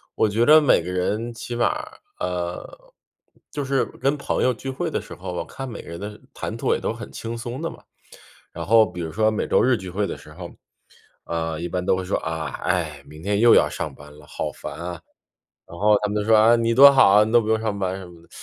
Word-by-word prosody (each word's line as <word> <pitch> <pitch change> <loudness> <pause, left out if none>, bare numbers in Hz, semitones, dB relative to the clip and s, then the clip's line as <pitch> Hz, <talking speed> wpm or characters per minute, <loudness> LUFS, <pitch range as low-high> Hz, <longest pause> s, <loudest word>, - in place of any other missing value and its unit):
我 110 - +2
觉 115 +3 +2
着 155 +1 +8
每 140 - +4
个 90 - -5
人 105 +6 -2
起 120 +1 -6
码， 120 - 0 0.3
呃 90 -1 -5 0.6
就 145 -2 -4
是 135 -1 +1
跟 140 +2 -1
朋 - - -1
友 130 - +3
聚 135 +3 -7
会 130 - -3
的 - - -2
时 - - -11
候， 90 - -7
我 85 - -3
看 135 +8 -7
每 110 - -7
个 - - -12
人 85 - -7
的 105 +1 -7
谈 - - -5
吐 - - +1
也 - - -3
都 - - -2
很 - - -9
轻 115 +1 -6
松 120 +2 -6
的 - - -2
嘛。 - - -13 0.7
然 - - -6
后 110 +1 +6
比 90 - -7
如 80 - -4
说 110 +3 +2
每 105 - -2
周 - - +3
日 130 0 +4
聚 95 - -8
会 100 +3 -1
的 - - -5
时 75 - -15
候， 90 0 -8 0.8
呃， 80 -1 -3
一 85 - -3
般 90 +1 -3
都 95 - +3
会 95 - -3
说： 95 - 0
“啊， 80 0 -4 0.2
唉， 80 -5 -1
明 75 +1 -13
天 100 0 0
又 120 +1 +7
要 - - +4
上 75 - -5
班 75 0 -14
了， 75 - -15
好 - - -4
烦 - - -8
啊。” 85 -1 -7 0.7
然 85 - -11
后 105 0 +4
他 105 - 0
们 105 - -3
就 105 - -5
说： 110 -1 +6
“啊， 115 +2 +6
你 115 0 +1
多 140 +3 +9
好 135 -5 +6
啊， 105 +2 +6
你 110 - -3
都 120 - +6
不 110 - -6
用 110 0 +2
上 110 -2 -2
班 95 -1 -2
什 95 - -9
么 85 -1 -15
的。” 85 - -23
105 Hz, 275 characters per minute, -23 LUFS, 85-115 Hz, 0.8 s, 多